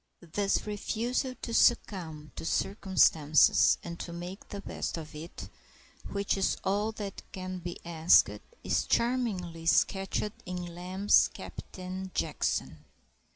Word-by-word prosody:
This 200 -1 +1
refusal 235 +5 -2
to 230 - -4
succumb 165 - +2
to - - -6
circumstances 165 -5 +4
and 170 0 -7
to 170 - -5
make 175 +3 -8
the 200 - -5
best - - -4
of 160 -1 -8
it, 155 +3 -8 0.6
which 200 0 0
is 195 - +1
all 205 +3 +1
that 205 -2 -6
can 185 0 -5
be 175 0 -6
asked, 165 0 +5 0.4
is - - +1
charmingly 195 -10 0
sketched 195 +4 +2
in 180 -1 -5
Lamb's 185 +3 +3
Captain 185 0 -7
Jackson. 75 -1 -1
185 Hz, 120 wpm, -30 LUFS, 170-205 Hz, 0.6 s, asked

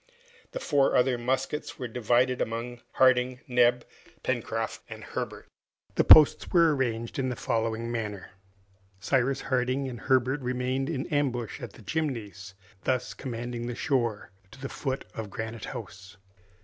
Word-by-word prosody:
The - - -3
four 140 - +2
other 125 0 +4
muskets 130 +5 -2
were 125 - -4
divided 125 +2 +1
among 120 +1 -3
Harding, 130 0 +3
Neb, 125 -1 +3 0.4
Pencroft, - - -2
and - - -8
Herbert. - - -5 0.5
The - - +3
posts 155 -2 +8
were 165 -4 +5
arranged 115 -2 -2
in 130 -1 0
the 125 - -2
following 115 0 -1
manner: 105 -4 -4 0.7
Cyrus 135 +5 +1
Harding 130 +1 0
and 120 -3 -6
Herbert 130 +1 +2
remained 130 +2 -1
in 140 -4 -2
ambush 125 -7 -1
at 120 -5 -7
the - - -15
Chimneys, 105 -7 -3 0.3
thus 130 -1 0
commanding 120 -2 -5
the 120 - -4
shore 120 -8 -1 0.2
to 115 - -15
the 135 0 -5
foot 135 -1 -3
of 110 -2 -5
Granite 110 +2 -5
House. 95 -2 -9
125 Hz, 145 wpm, -28 LUFS, 115-130 Hz, 0.7 s, posts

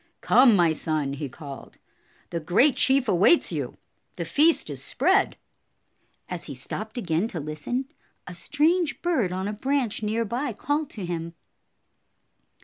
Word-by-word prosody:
"Come, 250 -4 +6
my 170 -4 +4
son," 150 -3 -1
he 140 0 -5
called. 140 +1 -10 0.5
"The 170 - -2
great 190 - +3
chief 265 -1 +3
awaits 205 - +4
you. - - -4 0.4
The - - -4
feast 315 +3 +3
is - - -6
spread." - - +2 0.9
As 180 -2 -6
he 140 - -7
stopped 215 - -5
again 175 -2 0
to 180 - -5
listen, 155 - -3 0.4
a 180 - -8
strange 310 - 0
bird 305 - +1
on 190 +2 -3
a 210 - -3
branch 260 0 -1
near 220 +2 -1
by 245 +4 -3
called 290 +6 -2
to 195 - -4
him. 170 -1 -5
210 Hz, 145 wpm, -25 LUFS, 165-265 Hz, 0.9 s, Come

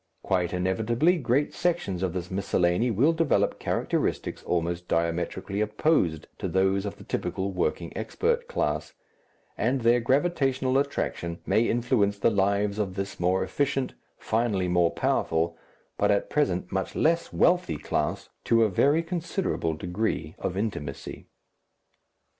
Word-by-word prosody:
Quite 90 -2 0
inevitably 110 - +1
great 135 +2 +1
sections 170 - -1
of 95 -3 -1
this 90 -1 -5
miscellany 95 +3 +1
will 125 +9 +3
develop 165 -2 +1
characteristics - - -1
almost 85 0 -2
diametrically 85 +4 -1
opposed 105 - +1
to - - -2
those 95 +1 +1
of 100 - -5
the - - -13
typical 95 +1 -2
working 90 -2 -2
expert 470 - -1
class, 485 - -2 0.7
and 130 +1 +1
their 120 +1 +4
gravitational 135 -1 +1
attraction 85 -11 -2
may 115 +1 +2
influence 115 -4 +1
the 100 - +3
lives 100 +1 +1
of 95 -3 -2
this 100 0 -4
more 90 +2 +2
efficient, 135 +6 -1 0.2
finally 110 -5 0
more 90 -1 +3
powerful, 80 +1 0 0.4
but - - +3
at 100 -1 +1
present 90 -13 0
much 95 -1 -2
less 165 +2 +1
wealthy, 175 - +2
class - - -2 0.2
to 115 0 +4
a 110 - +3
very 145 - +3
considerable 170 - -2
degree 90 -2 -2
of 90 - -3
intimacy. 85 -10 -4
100 Hz, 135 wpm, -27 LUFS, 90-135 Hz, 0.7 s, their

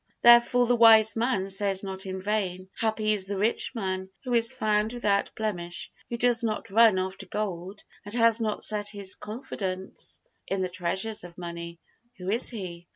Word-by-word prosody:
Therefore 240 +1 +6
the 245 +1 +2
Wise 225 -2 +6
Man 225 -5 0
says 195 0 0
not 190 0 -5
in 190 0 -5
vain: 190 -3 -2
"Happy 220 -1 +1
is 195 -2 0
the 200 0 -3
rich 220 +5 0
man, 190 -3 -3
who 250 -2 -3
is 230 0 +3
found 215 -3 0
without 205 -5 +1
blemish, 175 -6 -2 0.2
who 235 - -3
does 240 -1 +2
not 215 -3 -3
run 220 -2 +6
after 190 +1 -4
gold, 195 -1 -4 0.2
and 205 +3 -4
has 230 -1 +4
not 215 -2 -2
set 210 -1 +1
his 200 -2 -1
confidence 200 -5 -5 0.3
in 195 -1 -1
the 185 - -2
treasures 185 +4 -2
of 175 -1 -11
money. 170 -1 -7 0.4
Who 185 +1 -4
is 230 +4 +2
he? 175 -6 -7
205 Hz, 175 wpm, -27 LUFS, 190-225 Hz, 0.4 s, Therefore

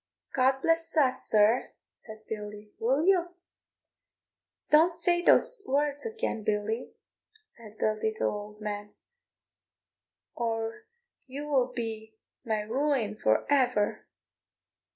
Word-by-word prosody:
"God 265 0 +2
bless 330 0 +1
us, 260 -4 +2
sir," 215 +3 +3 0.2
said 220 -1 -12
Billy; 210 -1 -7
"will 265 +7 +1
you?" 355 -2 +2 1.4
"Don't 325 +3 +5
say 345 +1 +2
these - - +5
words 290 - 0
again, 445 - -3
Billy," 215 +3 -2 0.6
said 220 - -14
the 215 - +1
little 220 0 -1
old 210 0 -8
man, 205 0 -5 1.4
"or 225 - -3 0.4
you 280 +3 -6
will 260 -4 +1
be 220 -2 -6 0.3
my 220 -3 -1
ruin 240 -1 -1
for 110 - +1
ever. 250 -7 +1
240 Hz, 110 wpm, -28 LUFS, 215-295 Hz, 1.4 s, Don't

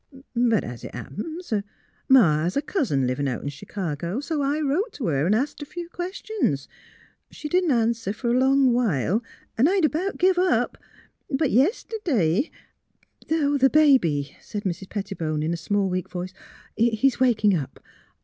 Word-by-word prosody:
But 235 -3 +3
as 120 -1 -8
it - - -8
happens, 230 - -6 0.6
Ma 175 - +6
has 175 - -1
a - - +2
cousin 235 - 0
livin' 130 +3 -1
out 125 -3 -3
in 145 - -2
Ch'cago, 170 - -4
so 295 +1 -2
I 285 +2 0
wrote 310 - 0
t' 265 - -5
her 145 -2 +1
an' 205 - +3
asked 280 +7 -2
a - - -4
few 345 +1 -7
questions. 355 - -2 0.6
She 300 - -7
didn't 360 +2 +2
answer 230 -5 +1
for 235 +3 -2
a 250 - +3
long 265 -1 +4
while, 215 - +1 0.4
an' 260 - +6
I'd 375 -1 +3
about 350 +6 -1
give 370 0 +3
up; 370 0 +2 0.5
but, 275 -1 +1
yeste'd'y 270 - +1 0.4
" - - -47
'' - - -28
The 285 -4 +3
baby," 175 - +3
said 205 -1 -6
Mrs. 190 0 -4
Pettibone, 170 -7 -3
in 160 +2 0
a - - 0
small, 200 +4 0
weak 185 -1 -3
voice, 180 +1 -5 0.3
" - - -30
is 235 +3 +2
waking 220 -6 +3
up. 140 -5 -5
235 Hz, 170 wpm, -24 LUFS, -, 0.6 s, Ma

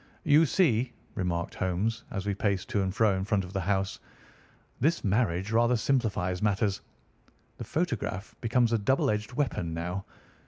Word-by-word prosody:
"You 155 +1 +5
see," 130 - +2 0.2
remarked 85 -4 -2
Holmes, 100 +5 -1
as 95 -2 -4
we 100 - 0
paced 100 0 -1
to 105 -5 +1
and 95 -1 0
fro 105 0 +3
in 95 - -2
front 100 0 +1
of 90 - -11
the 95 - -1
house, 95 +1 -1 0.8
"this 165 +6 +1
marriage 100 -2 +1
rather 120 +2 +4
simplifies 105 -8 0
matters. 100 -1 +1 0.8
The - - -6
photograph 125 - -2
becomes 120 0 +2
a 115 - +3
double 120 +3 +2
edged 105 +3 -3
weapon 115 - -1
now. 90 +4 -3
105 Hz, 160 wpm, -29 LUFS, 95-120 Hz, 0.8 s, You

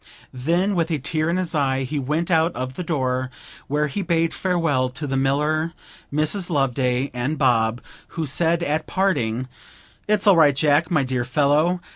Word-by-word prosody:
Then 170 +10 0
with 170 -2 0
a 160 - 0
tear 155 +3 -1
in 170 - 0
his 180 -2 -2
eye 135 -3 +1
he 145 +3 -3
went 155 +6 -1
out 165 +1 +2
of 130 +1 -4
the 180 - -5
door, 130 -6 -1 0.4
where 150 +2 0
he 150 +8 -3
bade 165 -2 0
farewell 165 -9 0
to 145 +4 -5
the 135 -1 -2
miller, 150 +5 0 0.4
Mrs. 155 +6 0
Loveday, 130 -3 0
and 125 +5 -2
Bob, 115 -2 +2 0.4
who 160 - -1
said 165 +4 +1
at 155 0 -1
parting, 130 - 0 0.6
'It's 210 -1 +1
all 200 -4 +6
right, 145 -4 +5
Jack, 150 +3 +2
my 155 -6 +2
dear 130 -1 -1
fellow. 150 +7 +2
150 Hz, 175 wpm, -22 LUFS, 130-170 Hz, 0.6 s, all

